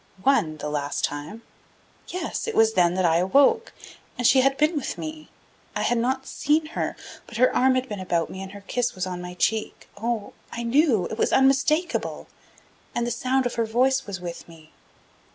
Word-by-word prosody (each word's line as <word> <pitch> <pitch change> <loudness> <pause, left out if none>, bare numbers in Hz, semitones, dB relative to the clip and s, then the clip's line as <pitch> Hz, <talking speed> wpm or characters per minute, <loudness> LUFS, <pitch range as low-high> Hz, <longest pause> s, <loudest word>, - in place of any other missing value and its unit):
"One, 165 - +2
the 150 - -5
last 145 -1 -2
time." 150 +11 -4 0.6
"Yes; 360 +4 -4
it 450 - -3
was 220 0 +4
then 175 -2 +3
that 185 -1 +1
I 165 -1 +4
awoke. 280 - +3 0.5
And 245 - -2
she 260 +2 +6
had 270 +1 +2
been 305 +3 +2
with 290 - -3
me. 310 0 -7 0.5
I - - -1
had 240 - +1
not 265 +3 -1
seen 310 +2 +1
her, - - -2 0.3
but 235 - -8
her 255 +2 +3
arm 260 0 +4
had 255 0 0
been 210 -5 -5
about 175 -3 0
me 190 - -7
and 195 0 -8
her 200 - -10
kiss 240 +4 -2
was 185 -1 -2
on 180 -1 -5
my 180 0 -7
cheek. 220 +4 -1
Oh. 220 0 -3 0.2
I 235 - -4
knew; 235 - +3
it 220 - -6
was - - +2
unmistakable. 275 +6 +2 0.7
And 240 - 0
the 240 - -2
sound 255 +2 0
of 245 - -1
her 230 - 0
voice 260 +3 +2
was 195 -2 -5
with 170 -1 -7
me." 160 -2 -16
235 Hz, 200 wpm, -25 LUFS, 185-265 Hz, 0.7 s, she